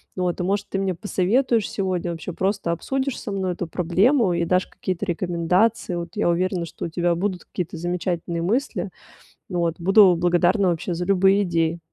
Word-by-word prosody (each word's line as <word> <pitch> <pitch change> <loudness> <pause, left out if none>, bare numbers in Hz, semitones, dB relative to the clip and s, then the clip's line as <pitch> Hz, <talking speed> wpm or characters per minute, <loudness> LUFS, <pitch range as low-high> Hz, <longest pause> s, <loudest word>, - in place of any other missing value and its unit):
Вот, 180 -1 -1
и, - - -1
может, 200 +2 -1
ты - - -2
мне 190 -1 0
посоветуешь 210 +5 +1
сегодня, 185 -3 -2
вообще 170 +2 -6
просто 190 -1 -1
обсудишь 265 - -2
со 210 - -6
мной 190 -2 -1
эту 175 -1 -5
проблему 185 - +2
и 170 0 0
дашь 180 +2 +1
какие-то 185 +1 -4
рекомендации. 180 +3 0
Вот 170 -1 -4
я 205 -4 +1
уверена, 175 0 0
что - - -7
у - - -4
тебя 175 +1 0
будут 185 0 -2
какие-то 180 +1 -5
замечательные 175 0 -2
мысли. 230 +11 -1 0.6
Вот, 170 -3 0
буду 195 0 +6
благодарна 175 +3 +2
вообще 170 +1 -2
за 175 +1 -3
любые 195 +1 +4
идеи. 170 -1 0
180 Hz, 175 wpm, -23 LUFS, 170-195 Hz, 0.6 s, буду